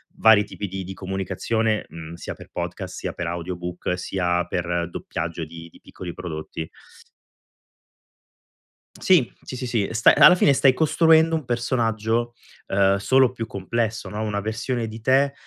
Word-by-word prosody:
vari 110 -2 +6
tipi 100 - -6
di 95 0 -5
di 95 - -7
comunicazione, 95 +4 -2
mhmm, 80 0 -9
sia - - -6
per - - -14
podcast, - - -5
sia - - -4
per - - -4
audiobook, 90 +1 -4
sia 90 -2 -1
per 85 -1 -2
doppiaggio 80 0 -4
di 85 +1 -11
di - - -18
piccoli 90 -2 -8
prodotti. 80 -1 -6 2.3
Sì, 175 -10 +3
sì, - - -7
sì, 125 0 -4
sì, 115 -4 0
sta 115 0 +5
alla - - +9
fine 150 - +4
stai 135 -1 +4
costruendo 160 +2 +4
un 155 -5 -3
personaggio, 120 -1 0 0.3
ehm, 100 0 +3
solo 130 +4 +3
più 115 -3 -5
complesso, 110 +3 -3
no, 105 +1 -4
una 105 -1 -2
versione 115 +2 -2
di 110 +1 -8
te 135 +4 +3
105 Hz, 150 wpm, -23 LUFS, 90-120 Hz, 2.3 s, alla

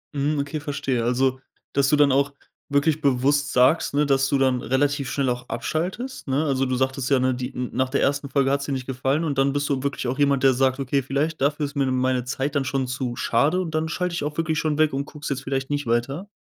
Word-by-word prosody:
Mhm, 145 +2 0
okay 145 +2 -3
verstehe, 140 -5 -2
also 130 +2 +1 0.3
dass 140 -1 +2
du 150 - +4
dann 145 -1 +4
auch 140 +1 +2 0.4
wirklich 145 +2 +2
bewusst 140 +2 +2
sagst, 130 +4 +3
ne, 150 - +3
dass 135 -1 +2
du 140 - +2
dann 130 -2 +2
relativ 140 +2 0
schnell 140 -2 0
auch 125 +1 -4
abschaltest, 185 - -3
ne? 140 +4 +1
Also, 135 -2 +1
du 130 - -1
sagtest 130 +1 -1
ja, 135 - +4
ne, 130 0 +2
die 125 0 -5
n 125 -1 -4
nach 130 0 0
der 140 - 0
1. 140 0 0
Folge 135 -1 +2
hat's 140 0 0
dir 145 - -4
nicht 130 -1 -3
gefallen 135 +4 -1
und 145 -4 -2
dann 135 0 +2
bist 145 0 -1
du 135 -2 0
wirklich 140 -3 -2
auch 130 +3 -2
jemand, 140 -2 +2
der 135 -1 +6
sagt: 130 +1 +1
„Okay, 135 +1 0
vielleicht 140 +4 -2
dafür 145 +2 +1
ist 140 - -7
mir 140 -1 +1
meine 130 -1 +1
Zeit 135 +3 -3
dann 140 - +2
schon 135 -1 -1
zu 125 -1 -3
schade 145 +10 +1
und 165 -4 -3
dann 160 0 0
schalte 180 +1 -2
ich 170 - -2
auch 150 +1 -4
wirklich 160 -1 0
schon 155 -2 0
weg 155 -3 +3
und 140 +1 -2
gucke 150 0 -13
es - - -2
jetzt 135 -1 -2
vielleicht 135 +1 -3
nicht 145 -3 -2
weiter?“ 135 - -1
140 Hz, 255 wpm, -23 LUFS, 130-145 Hz, 0.4 s, der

